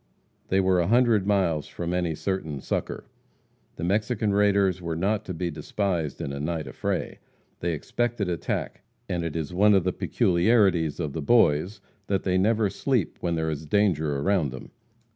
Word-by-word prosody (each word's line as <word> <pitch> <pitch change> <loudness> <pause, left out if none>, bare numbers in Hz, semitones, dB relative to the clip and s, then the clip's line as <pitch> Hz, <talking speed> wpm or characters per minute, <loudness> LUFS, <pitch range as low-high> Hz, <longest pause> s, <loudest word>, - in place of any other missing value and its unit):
They 95 - +2
were 95 -1 +3
a 85 - +1
hundred 115 -3 +3
miles 90 -8 +1
from 85 0 -4
any 90 -3 0
certain 80 -6 -3
succor. - - -3 0.7
The - - -6
Mexican 105 +3 0
raiders 100 -3 +2
are 85 -1 -3
not 100 +5 0
to 90 - -4
be 85 +1 -2
despised 80 0 -2
in 70 - -4
a 70 - -5
night 80 +1 -2
affray. - - -3 0.4
They 85 0 -1
expected 115 +6 -2
attack, 85 -4 -3 0.3
and 85 -1 -2
it 85 -2 -4
is 80 0 -3
one 105 +3 +5
of 95 - +3
the 90 0 0
peculiarities 90 -4 +2
of 75 -5 -3
the 80 - -3
Boys, 95 +1 +3 0.3
that 95 -2 0
they 95 -1 +1
never 110 +2 +2
sleep 120 0 -1
when 85 -1 -1
there 80 0 -1
is 75 +1 -6
danger 90 -4 +2
surrounding 90 0 +1
them. - - -14
90 Hz, 175 wpm, -26 LUFS, 80-100 Hz, 0.7 s, one